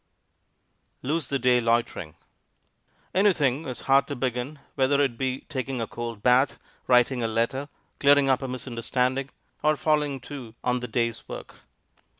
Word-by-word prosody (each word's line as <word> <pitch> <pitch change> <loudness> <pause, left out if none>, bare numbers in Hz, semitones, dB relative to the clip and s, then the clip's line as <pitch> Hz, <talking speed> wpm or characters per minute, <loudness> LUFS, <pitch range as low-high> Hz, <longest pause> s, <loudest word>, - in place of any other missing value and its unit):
LOSE 155 +5 -1
THE 140 - 0
DAY 125 -1 +3
LOITERING 115 -8 0 1.0
Anything 165 -7 +2
is 125 - -5
hard 135 +1 +4
to 145 - -4
begin, 125 +3 -2 0.2
whether 140 +1 +2
it 135 -4 +2
be 130 +1 -2
taking 135 -3 -4
a 115 - -1
cold 115 -2 -6
bath, 125 +2 +4 0.3
writing 125 0 +4
a 115 - +1
letter, 115 +6 -1 0.3
clearing 140 -1 +5
up 130 0 +3
a 135 - -3
misunderstanding, 125 +1 -1 0.3
or 155 0 +3
falling 150 -2 +1
to 120 -4 -9
on 125 0 +1
the 125 - -5
day's 115 0 -2
work. - - -8
130 Hz, 150 wpm, -26 LUFS, 120-140 Hz, 1.0 s, clearing